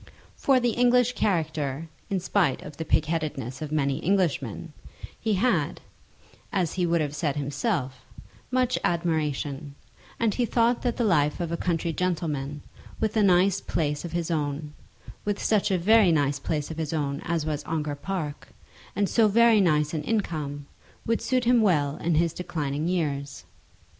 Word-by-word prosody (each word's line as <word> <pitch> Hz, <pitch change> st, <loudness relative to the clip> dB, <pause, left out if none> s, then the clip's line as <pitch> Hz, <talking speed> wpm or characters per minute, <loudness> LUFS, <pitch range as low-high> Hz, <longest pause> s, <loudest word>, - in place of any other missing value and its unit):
For 270 Hz, -2 st, +3 dB
the 240 Hz, -1 st, +1 dB
English 245 Hz, +1 st, +3 dB
character, 160 Hz, -, -1 dB, 0.2 s
in 195 Hz, -, 0 dB
spite 175 Hz, -6 st, +1 dB
of 150 Hz, -, -9 dB
the 160 Hz, -, -4 dB
pigheadedness 150 Hz, -6 st, -1 dB
of 155 Hz, -1 st, -5 dB
many 140 Hz, -3 st, 0 dB
Englishmen, 165 Hz, -, 0 dB, 0.5 s
he 220 Hz, -1 st, 0 dB
had, 245 Hz, +6 st, +1 dB, 0.7 s
as 185 Hz, -7 st, 0 dB
he 180 Hz, -2 st, 0 dB
would 170 Hz, -1 st, +2 dB
have 145 Hz, -1 st, -2 dB
said 145 Hz, -2 st, -1 dB
himself, 145 Hz, -, -2 dB, 0.5 s
much 255 Hz, -1 st, +1 dB
admiration, 150 Hz, -4 st, -1 dB, 0.4 s
and 225 Hz, -3 st, +2 dB
he 250 Hz, -, 0 dB
thought 235 Hz, +1 st, +2 dB
that 245 Hz, -2 st, -1 dB
the 240 Hz, -, +1 dB
life 150 Hz, -8 st, +2 dB
of 170 Hz, -2 st, -2 dB
a -, -, 0 dB
country 170 Hz, -1 st, -1 dB
gentleman, 150 Hz, -5 st, -2 dB, 0.4 s
with 220 Hz, -1 st, -1 dB
a 220 Hz, -, +4 dB
nice 190 Hz, 0 st, +4 dB
place 150 Hz, -3 st, -1 dB
of 170 Hz, -, -6 dB
his 170 Hz, -1 st, -2 dB
own, 150 Hz, -1 st, -2 dB, 0.5 s
with 205 Hz, -1 st, -1 dB
such 210 Hz, -1 st, +2 dB
a 190 Hz, -, +2 dB
very 205 Hz, +1 st, +5 dB
nice 145 Hz, -3 st, +1 dB
place 150 Hz, +2 st, -2 dB
of 160 Hz, -, -7 dB
his 160 Hz, -1 st, -3 dB
own 140 Hz, -2 st, -2 dB
as 165 Hz, -2 st, -1 dB
was 150 Hz, -2 st, -2 dB
Ongar 155 Hz, -2 st, -2 dB
Park, 150 Hz, -1 st, -4 dB, 0.5 s
and 205 Hz, -1 st, +1 dB
so 225 Hz, +1 st, +4 dB
very 225 Hz, 0 st, +5 dB
nice 150 Hz, -4 st, +2 dB
an 155 Hz, -, -1 dB
income, 150 Hz, -7 st, -2 dB, 0.4 s
would 230 Hz, 0 st, 0 dB
suit 255 Hz, -2 st, 0 dB
him 240 Hz, -1 st, +5 dB
well 150 Hz, -8 st, +2 dB
in 170 Hz, -1 st, 0 dB
his 165 Hz, +1 st, +2 dB
declining 155 Hz, -4 st, -3 dB
years. 145 Hz, -6 st, -2 dB
165 Hz, 165 wpm, -26 LUFS, 150-200 Hz, 0.7 s, very